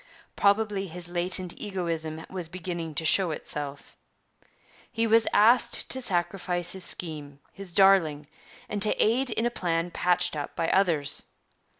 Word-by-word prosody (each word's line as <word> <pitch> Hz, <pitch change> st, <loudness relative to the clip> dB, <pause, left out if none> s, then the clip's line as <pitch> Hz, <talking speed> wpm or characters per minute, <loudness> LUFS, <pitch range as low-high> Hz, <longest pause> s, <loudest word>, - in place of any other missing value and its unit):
Probably 200 Hz, -1 st, +1 dB
his 175 Hz, 0 st, -8 dB
latent 175 Hz, +1 st, +1 dB
egoism 165 Hz, -5 st, -4 dB
was 180 Hz, -3 st, -7 dB
beginning 170 Hz, -3 st, -6 dB
to 160 Hz, -, -2 dB
show 185 Hz, +3 st, +3 dB
itself. 145 Hz, -2 st, -6 dB, 1.0 s
He 230 Hz, 0 st, 0 dB
was 225 Hz, 0 st, +4 dB
asked 235 Hz, +4 st, +3 dB
to 260 Hz, -, +4 dB
sacrifice 175 Hz, -3 st, -1 dB
his 190 Hz, -1 st, -3 dB
scheme, 150 Hz, -5 st, -2 dB
his 195 Hz, -2 st, -3 dB
darling, 170 Hz, -6 st, +3 dB, 0.4 s
and 205 Hz, -1 st, -4 dB
to 215 Hz, -, +4 dB
aid 250 Hz, +4 st, +2 dB
in 225 Hz, 0 st, -1 dB
a 240 Hz, -, 0 dB
plan 170 Hz, -4 st, -2 dB
patched 180 Hz, -1 st, +1 dB
up 145 Hz, -1 st, -6 dB
by 165 Hz, -, -1 dB
others. 170 Hz, -7 st, +1 dB
180 Hz, 140 wpm, -26 LUFS, 165-200 Hz, 1.0 s, was